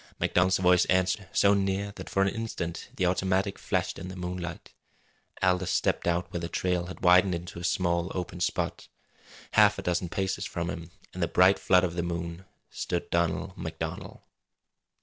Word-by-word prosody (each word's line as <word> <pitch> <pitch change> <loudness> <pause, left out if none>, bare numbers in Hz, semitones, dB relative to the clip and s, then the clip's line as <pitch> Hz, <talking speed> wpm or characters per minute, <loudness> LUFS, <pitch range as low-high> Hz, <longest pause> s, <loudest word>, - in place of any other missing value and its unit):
MacDonald's 90 +1 +3
voice 90 -1 +4
answered, 95 +2 +1
so 100 0 +4
near 100 0 0
that - - -8
for 95 - +2
an - - +2
instant 100 -6 -4
the 90 - 0
automatic 95 +2 0
flashed - - -1
in - - -7
the 95 - -7
moonlight. 90 -1 -6 0.7
Aldous 90 0 +2
stepped 85 - +1
out 85 +1 0
where 85 - -1
the 85 0 -4
trail 90 -1 -1
had 90 - -9
widened 90 0 +5
into 85 0 -7
a - - -8
small 85 0 0
open 90 -1 -4
spot. 85 - -2 0.6
Half - - +5
a - - -5
dozen 90 0 -1
paces 95 +1 -2
from 85 0 -3
him, 85 -2 -7 0.2
in 90 - -8
the 85 - +2
bright 95 +4 +5
flood 90 0 +4
of 90 -2 0
the 85 - -1
moon, 85 +1 -4 0.3
stood 85 - -3
Donald 85 +2 0
MacDonald. 80 -3 -6
90 Hz, 175 wpm, -28 LUFS, 85-95 Hz, 0.7 s, widened